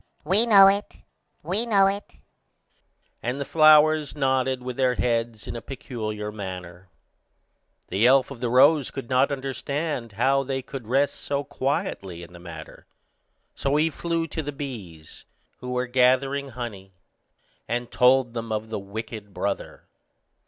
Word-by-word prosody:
We 200 +9 +2
know 200 -3 +8
it, 200 +2 +2 0.5
we 215 +6 -1
know 200 -3 +5
it," 200 +1 -2 1.1
and 125 +3 -3
the 140 - -3
flowers 155 -1 +5
nodded 130 -2 0
with 125 -1 -5
their 130 -1 +2
heads 115 -4 -1
in - - -5
a 115 - -5
peculiar 110 -4 -5
manner. 90 -3 -8 1.0
The 100 +6 +3
elf 130 +1 +4
of 135 - -8
the 120 -1 -1
rose 140 +3 +5
could 135 -2 -8
not 130 +2 +3
understand 140 -2 -3
how 135 +6 +2
they 135 -1 -3
could 130 -5 -8
rest 135 +4 +2
so 140 0 -2
quietly 140 - -3
in 85 - -13
the 90 - -12
matter, 80 -2 -11 0.7
so 140 +1 -1
he 155 +2 +2
flew 165 +1 -2
to 160 - -3
the 145 -1 -5
bees, 105 - -9 0.3
who 125 - -7
were 125 0 -1
gathering 130 +2 +2
honey, 105 -7 -7 0.7
and 120 0 -3
told 125 -1 +4
them 115 -1 -5
of 110 +1 -3
the 110 - -2
wicked 105 0 -8
brother. 100 +2 -3
130 Hz, 150 wpm, -25 LUFS, 110-145 Hz, 1.1 s, know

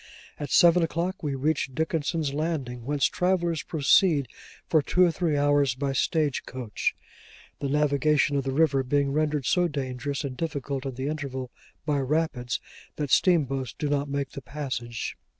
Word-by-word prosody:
At 145 - -4
seven 175 0 +6
o'clock 170 +3 -1
we 145 -3 -2
reached 135 -1 -1
Dickenson's 160 -2 -1
Landing, 140 -6 -3
whence 145 -1 +1
travellers 175 -3 +1
proceed 150 -1 +3 0.4
for 155 - +4
two 180 +5 +3
or 175 - +2
three 165 -3 0
hours 145 -2 +3
by 135 +1 -2
stage 150 0 +1
coach: 125 -5 -2 0.6
the 140 - -2
navigation 145 0 +2
of 140 - +1
the 135 - -2
river 140 -1 +3
being 140 +1 +1
rendered 150 -2 0
so 180 +6 +3
dangerous 140 -1 -3
and 135 -3 -4
difficult 140 -3 -3
in 130 - -5
the 130 +1 -4
interval, 135 -4 -4 0.3
by 145 -2 +1
rapids, 135 -3 -1 0.4
that 145 -3 -3
steamboats 135 -8 +2
do 150 - -2
not 145 0 0
make 140 -1 -2
the 140 - -7
passage. 130 -5 -5
145 Hz, 160 wpm, -26 LUFS, 135-155 Hz, 0.6 s, seven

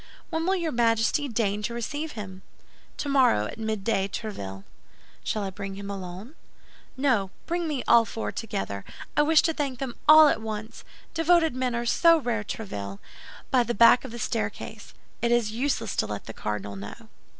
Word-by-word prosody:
"When 325 +1 -1
will 380 - +3
your 340 -4 -1
Majesty 230 +4 +2
deign 210 -4 0
to 235 +3 -3
receive 295 +6 -4
him?" 190 -3 -8 0.6
"Tomorrow, 265 - +3
at 165 - -7
midday, 215 -2 0
Tréville." 100 - -6 0.6
"Shall 215 - -1
I 195 - -3
bring 195 0 -6
him 200 0 -6
alone?" 190 - -7 0.6
"No, 250 -8 +2 0.2
bring 345 0 -1
me 285 -5 -2
all 235 - +7
four 225 0 -4
together. 195 - -4 0.3
I - - +5
wish 310 +1 +5
to 325 - +2
thank 280 -4 -2
them 260 -1 -4
all 310 0 +10
at 255 - +1
once. 220 0 -6 0.3
Devoted 330 -2 +3
men 255 -1 -1
are 235 0 -2
so 335 +7 +5
rare, 240 -7 -1
Tréville, 100 - -6 0.5
by 255 - +5
the 240 0 -1
back 235 +3 +7
staircase. 215 -3 -4 0.3
It 235 - +1
is 235 -3 +2
useless 230 -3 -1
to - - +1
let 105 -1 -5
the 115 - -7
cardinal 105 -2 -4
know." 100 +1 -9
230 Hz, 170 wpm, -26 LUFS, 200-275 Hz, 0.6 s, all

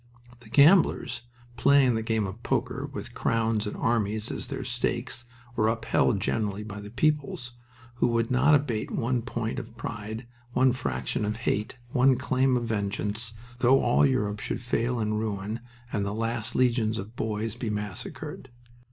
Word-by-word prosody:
The 115 -2 -15
gamblers, 140 - +5 0.4
playing 135 0 +5
the 110 - 0
game 110 -1 0
of 95 +5 -7
"poker," - - -1
with - - -6
crowns 110 -2 +1
and - - -5
armies 110 -2 0
as - - -5
their - - -4
stakes, 120 - -2 0.3
were 110 - +3
upheld 115 -1 +2
generally 105 0 -1
by 105 -1 -7
the 105 - -8
peoples, 140 -1 0 0.5
who 120 - +3
would 115 0 +1
not 135 +4 +5
abate 130 -7 0
one 120 +1 0
point 115 -1 -3
of 115 0 -10
pride, 110 +1 -5 0.3
one 130 0 +4
fraction 65 - -2
of 105 +1 -1
hate, 105 +4 0
one 130 0 +4
claim 130 -1 +2
of 120 - -2
vengeance, 105 +1 -2 0.3
though 130 +2 +5
all - - +3
Europe 105 -7 +1
should - - -3
fall 120 0 0
in 110 -1 0
ruin 105 0 -3 0.3
and 105 - +1
the 100 +1 -2
last 115 0 -2
legions 115 -3 +2
of 105 +3 -7
boys 110 -1 -2
be 120 -2 -3
massacred. 105 -3 -5
115 Hz, 160 wpm, -27 LUFS, 105-125 Hz, 0.5 s, gamblers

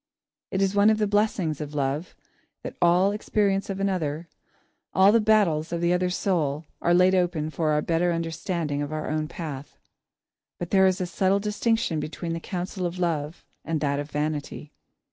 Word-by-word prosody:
It 190 +1 0
is 195 0 +1
one 205 +1 +5
of 220 - +3
the 215 - +1
blessings 200 -7 0
of 150 0 -6
love, 145 +4 -2 0.5
that - - -6
all 175 +3 +4
the - - -3
experience 200 -2 0
of 195 0 -3
another, 170 -5 -1 0.7
all 190 +1 +6
the 230 +1 +4
battles 195 -8 +2
of 170 - -1
the 170 +1 +2
other 180 0 +1
soul, 165 -5 -1 0.2
are 175 - +2
laid 185 +1 +5
open 175 -4 0
for 155 -1 -1
our 150 0 +1
better 170 +1 +1
understanding 165 -2 -2
of 145 +1 -4
our 155 0 -3
own 155 0 -1
path. 150 -4 -7 0.8
But 175 - -6
there 190 -1 +5
is 185 0 0
a - - 0
subtle 190 +2 +1
distinction 210 -4 0
between 165 +3 -4
the 165 - -3
counsel 180 +1 -4
of 175 +1 -7
love 165 -3 -2 0.2
and 160 -1 -2
that 140 -1 0
of 145 +1 -5
vanity. 150 0 -4
175 Hz, 185 wpm, -25 LUFS, 155-190 Hz, 0.8 s, all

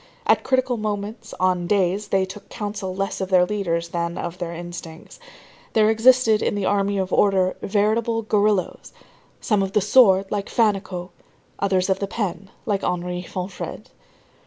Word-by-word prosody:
At - - +3
critical 260 -2 +1
moments, 215 +1 -4
on 180 -1 +1
"days" 195 +1 +1
they 190 -1 +1
took 200 +2 -11
counsel 205 -3 -5
less 195 0 -3
of 190 - -3
their 180 -2 +5
leaders 170 -4 -2
than 170 0 -3
of 175 +1 -5
their 175 -2 -4
instincts. 170 - -9 0.5
There 215 0 +4
existed 225 -1 +4
in - - 0
the 200 -2 -1
army 200 0 +1
of 190 -1 -2
order, 190 -2 +3
veritable 220 +3 +1
guerilleros, 210 -3 0 0.5
some 210 -4 +1
of 195 0 -2
the - - +4
sword, 200 -2 +5
like 200 -1 -2
Fannicot, 195 -5 0 0.5
others 190 -2 +1
of 190 -1 +1
the 200 - -2
pen, 195 -2 -4 0.2
like 205 -4 -1
Henri 180 0 -2
Fonfrède. 185 +1 -6
195 Hz, 160 wpm, -22 LUFS, 185-210 Hz, 0.5 s, their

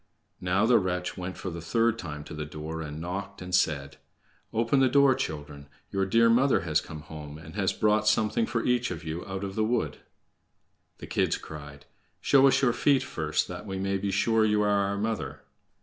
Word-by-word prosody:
Now 90 +4 +1
the 120 +1 +5
wretch 90 -2 -2
went 90 0 -6
for 95 - -5
the 85 0 -6
third 115 +7 +1
time 75 -6 -6
to 75 - -10
the 75 0 -4
door, 75 +2 -6
and 75 -1 -6
knocked 100 +4 -5
and 90 0 -8
said: 70 -5 +1 0.5
"Open 115 +4 +2
the 130 -1 +4
door, 140 -1 +5
children. 75 - -5 0.2
Your 95 -1 0
dear 115 +4 +4
mother 125 +4 +4
has 85 -1 +1
come 75 -1 -9
home, 75 -1 -9
and 80 0 -11
has 100 -1 +1
brought 110 0 +2
something 110 +1 +2
for 115 - -1
each 125 0 +2
of 80 -4 -6
you 80 +2 -4
out 95 0 -4
of 95 -1 -4
the 110 - 0
wood." 115 +2 -1 1.0
The - - -9
kids - - 0
cried: 75 -2 -10 0.3
"Show 140 -1 +5
us 135 +1 +3
your 120 -3 +4
feet 135 +3 +3
first, 75 -1 -1
that 90 +4 -7
we 95 -1 -4
may 95 0 -1
be 100 +1 -2
sure 110 +3 +2
you 105 -1 +3
are 105 - +2 0.2
our 100 0 -2
mother." 110 +2 -3
95 Hz, 205 wpm, -28 LUFS, 80-115 Hz, 1.0 s, the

